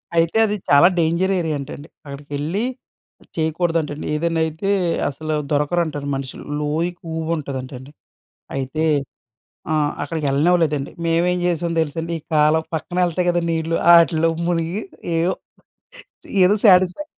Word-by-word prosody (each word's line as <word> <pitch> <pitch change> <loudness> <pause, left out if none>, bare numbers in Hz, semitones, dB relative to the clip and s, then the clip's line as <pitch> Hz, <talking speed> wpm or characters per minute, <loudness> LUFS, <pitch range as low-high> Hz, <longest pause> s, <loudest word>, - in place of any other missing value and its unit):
అయితే 165 +5 +2
అది 210 -1 -1
చాలా 145 +5 +7
డేంజర్ 170 +4 +1
ఏరియా 160 -3 -1
అంటండి. 140 +2 -8 0.2
అక్కడికెళ్లి 145 +7 -4 0.7
చేయకూడదంటండి. 160 -2 -1
ఏదైనా 165 +1 0
అయితే 160 +5 -3 0.4
అసలు 155 +2 -4 0.2
దొరకరంటండి 150 -1 0
మనుషులు. 135 -1 -6 0.2
లోయెక్కువగా 160 +1 -3
ఉంటదంటండి. 130 -1 -7 0.7
అయితే 135 +4 -2 0.9
ఆ! - - +2 0.3
అక్కడికెళ్ళనివ్వలేదండి. 150 0 +1
మేమేం 175 +2 +2
చేశాం 170 -1 0
తెలుసండి. 165 +2 -3
ఈ - - -8
కాలవ 155 +1 +4
పక్కన 160 +3 -4
ఎళ్తాయి 175 +1 -1
కదా! 175 - +2
నీళ్లు, 165 0 -1 0.2
ఆటిల్లో 165 -1 +5 0.2
మునిగి 175 +4 -1 0.3
ఏయో, 170 +3 +2 1.1
ఏదో 195 +3 +5
సాటిస్‌ఫై 185 +6 +5
160 Hz, 110 wpm, -21 LUFS, 150-175 Hz, 1.1 s, చాలా